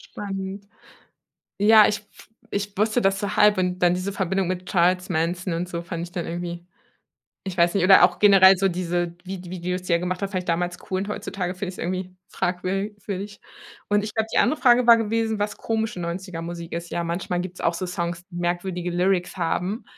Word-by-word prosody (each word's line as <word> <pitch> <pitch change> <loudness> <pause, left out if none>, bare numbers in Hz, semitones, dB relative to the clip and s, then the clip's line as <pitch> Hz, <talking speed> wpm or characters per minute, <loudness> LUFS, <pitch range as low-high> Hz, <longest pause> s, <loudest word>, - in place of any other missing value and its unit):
Spannend. 195 0 -5 0.9
Ja, 215 0 +7
ich 210 - -1
w - - -28 0.5
ich 205 0 -3
wusste 220 +3 +2
das 195 0 +2
so 200 0 -3
halb 210 -1 +5
und 180 0 -1
dann 175 0 +4
diese 185 +2 -3
Verbindung 190 -1 -1
mit 185 0 -3
Charles 180 +1 +2
Manson 175 +2 -1
und 175 +2 -3
so 170 -1 -4
fand 170 0 -5
ich 175 - -11
dann 175 -2 -4
irgendwie 175 0 -5 0.8
ich 190 -2 -5
weiß 170 +2 +4
nicht, 195 - +2
oder 185 -1 +8
auch 175 0 +2
generell 195 -2 +7
so 195 +1 +2
diese 175 -1 -2
Vid 185 -1 -7
Videos 180 0 -3
die 180 -1 -3
er 170 - +4
gemacht 180 +1 -3
hat, 200 - -2
fand 185 -2 -2
ich - - -21
damals 175 +1 -1
cool 185 - 0
und 200 - -4
heutzutage 185 -3 -4
finde 185 0 -5
ich 185 - -6
es - - -15
irgendwie 185 +1 -4
fragwür 185 +3 -2 0.2
würdig. 205 +1 -5 0.5
Und 205 0 +2
ich 210 0 -6
glaube, 220 0 0
die - - +2
andere 310 - +2
Frage 245 -1 +5
war 235 -1 +9
gewesen, 225 0 -1
was 210 0 -1
komische 220 -3 -2
90er- 170 0 -5
Musik 170 0 -7
ist. 170 0 -5
Ja, 170 - -2
manchmal 175 +1 -2
gibt 180 0 -6
es - - -10
auch 170 - +1
so 175 - -3
Songs, 175 -1 -4
die 175 - -9
merkwürdige 175 0 -2
Lyrics 180 +1 0
haben 185 +5 -2
185 Hz, 215 wpm, -24 LUFS, 175-200 Hz, 0.9 s, war